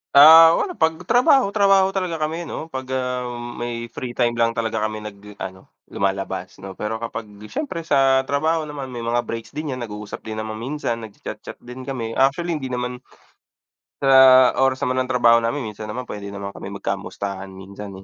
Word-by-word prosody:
Ah, 160 +3 +10
wala 385 - -1
'pag 160 - +1
trabaho, 250 -2 +4
trabaho 195 -2 +4
talaga 185 -3 -2
kami 160 +2 -3
ano 160 - -6
'pag, 130 -1 -5
ah, 125 -1 -2 0.3
may 120 0 -4
free 120 -1 -6
time 120 -2 +2
lang 115 0 +2
talaga 115 -1 -1
kami 110 0 -7
nag 105 -1 -10
ano 95 -1 -8 0.2
lumalabas 95 -1 -2
no. 95 - -6
Pero 105 +1 -2
kapag 115 -1 -5 0.2
siyempre 190 - -4
sa 135 -4 +3
trabaho 155 +4 0
naman 145 -3 -6
may 120 -2 -6
mga 120 +1 +1
breaks 115 0 -6
din 150 -3 -4
yan 125 - -5
nag-uusap 105 -2 -7
din 110 0 -5
naman 110 0 -4
minsan, 120 -2 -3
nagcha-chat-chat 110 -2 -9
din 125 +2 -10
kami, 120 -4 -4
actually 160 +6 +1
hindi 135 -4 -5
naman 125 0 -4 0.9
sa 130 -2 +7
oras 135 0 +3
naman 130 0 +1
ng 130 - -13
trabaho 120 -2 +5
namin 115 -1 -2
minsan 105 +1 -8
naman 125 +4 -5
puwede 100 -3 -7
naman 100 0 -6
kami - - -8
magkamustahan 100 0 -4
minsan, 95 +2 -9
125 Hz, 180 wpm, -22 LUFS, 110-145 Hz, 0.9 s, Ah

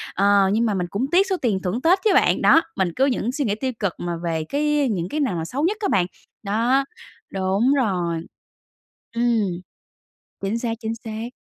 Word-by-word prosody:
ờ, 200 0 +4
nhưng 230 +2 +2
mà 215 - +1
mình 180 -2 -1
cũng 215 +6 -1
tiếc 380 +3 +4
số 380 - 0
tiền 210 -7 +1
thưởng 200 +8 -2
Tết 360 +5 +4
chứ 435 - +4
bạn. - - +3
Đó, 325 - +6
mình 185 -2 0
cứ 265 - +3
những 245 -3 0
suy 285 -1 -2
nghĩ 205 - 0
tiêu 260 +4 -2
cực 200 -5 -1
mà 175 0 -3
về 165 -2 -1
cái 295 -2 +1
những 180 -3 -2
cái 305 - -2
nào 265 -11 0
mà 165 -1 -3
xấu 265 - -3
nhất 395 +6 +1
á 405 - 0
bạn, 180 -3 +3 0.4
đó, 235 +7 +1 0.5
đúng 195 +7 +2
rồi. 180 -10 0 0.9
Ừm, 235 0 +2 1.0
chính 200 +4 -1
xác, 235 -1 -2
chính 225 0 -3
xác. 220 +1 -5
225 Hz, 205 wpm, -22 LUFS, 190-270 Hz, 1.0 s, Đó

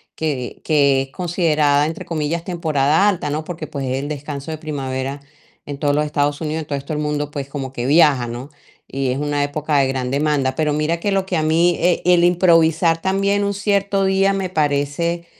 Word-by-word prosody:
que, 140 -6 -4
que 140 -3 +3
es 135 - -13
considerada 155 -4 +1
entre 160 - -6
comillas 165 +1 -2
"temporada 160 0 +1
alta", 180 -6 -2
¿no?, 155 +2 -2
porque 160 -1 -6
pues 140 -1 -5
es 130 0 -1
el 140 +2 -4
descanso 145 0 -6
de 155 - -4
primavera 135 -2 -4 0.5
en 145 -1 -6
todos 145 -1 +1
los 150 +1 +1
Estados 145 0 -1
Unidos, 155 0 -2
en 155 - -9
todo 140 - -2
esto 140 +3 -6
el 150 - -2
mundo, 150 -1 -2
pues 140 -2 -5
como 135 -2 -5
que 120 -2 -4
viaja, 145 -5 +4
¿no?, 120 +4 -7 0.4
y 135 -1 -2
es 125 - -1
una 145 0 -1
época 150 +1 -1
de 135 - +3
gran 130 -1 -2
demanda, 140 -2 0
pero 150 0 0
mira 155 +3 0
que 200 +4 -1
lo 195 -1 +1
que 185 -2 -1
a 155 - 0
mí, 165 +3 +3
eh, 175 +1 +2
el 175 -1 +4
improvisar 165 -2 +3
también 195 +1 +1
un 200 0 0
cierto 200 -1 +1
día 195 +1 +2
me 195 -1 -2
parece, 155 +2 -1
150 Hz, 210 wpm, -20 LUFS, 140-170 Hz, 0.5 s, viaja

